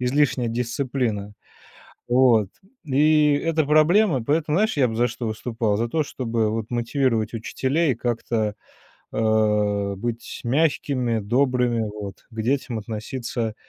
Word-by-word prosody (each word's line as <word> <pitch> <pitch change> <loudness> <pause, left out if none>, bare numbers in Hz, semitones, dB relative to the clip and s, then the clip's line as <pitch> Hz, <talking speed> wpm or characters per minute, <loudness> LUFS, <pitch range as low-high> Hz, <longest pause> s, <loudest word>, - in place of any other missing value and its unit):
излишняя 125 -1 +1
дисциплина. 120 -3 -2 0.8
Вот. 120 -5 +4 0.4
И 150 +1 +4
это 160 +1 +1
проблема. 155 - +3
Поэтому 150 +2 +1
знаешь, 215 -2 +1
я 130 -3 +3
бы 110 - -4
за 120 +1 +3
что 115 -1 -4
выступал 110 -1 -1
за 115 +2 -1
то, 155 +6 0
чтобы 115 -6 -1
вот 110 0 -3
мотивировать 120 -2 0
учителей, 135 +6 0
как-то, 115 -2 -2 0.6
а, 105 -2 +1
быть 115 +3 -5
мягкими, 130 -3 +1
добрыми, 125 +1 +1
вот. 105 -2 -7
К 110 0 -4
детям 125 -1 -1
относиться 115 +1 -4
120 Hz, 125 wpm, -23 LUFS, 110-140 Hz, 0.8 s, Вот